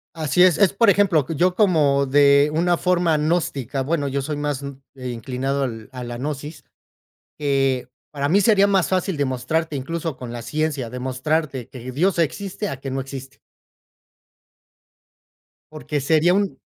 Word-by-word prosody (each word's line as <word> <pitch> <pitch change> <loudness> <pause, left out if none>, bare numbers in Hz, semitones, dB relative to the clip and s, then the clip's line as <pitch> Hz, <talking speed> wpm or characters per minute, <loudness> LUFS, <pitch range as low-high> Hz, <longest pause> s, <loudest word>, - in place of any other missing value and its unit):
Así 155 +1 +1
es, 180 -4 +5
es, 200 -2 +4
por 225 +2 +4
ejemplo, 190 -8 +3
yo 175 +4 +2
como 150 -9 +3
de 140 +1 +5
una 175 +2 +2
forma 175 -3 +2
gnóstica. 145 -5 -1
Bueno, 145 0 -1
yo 140 0 -1
soy 150 +2 -4
más 145 -2 -3 0.3
inclinado 130 +2 -3
al 115 -3 -5
a 125 -1 -7
la 120 0 -6
gnosis, 145 +2 -6 0.8
que 135 -3 0 0.2
para 140 -1 -2
mí 190 +6 +4
sería 200 -1 +4
más 195 -3 +2
fácil 185 -1 0
demostrarte 145 +3 -1
incluso 160 +2 -4
con 125 -2 -8
la 120 - -6
ciencia, 140 0 -2
demostrarte 130 +1 -2
que 130 -1 -8
Dios 175 +7 +1
existe, 195 +5 -2
a 135 - -5
que 135 - -5
no 135 +1 -2
existe. 135 0 -9 2.3
Porque 150 -1 -4
sería 160 +5 +3
un 200 -1 -1
145 Hz, 150 wpm, -22 LUFS, 135-170 Hz, 2.3 s, es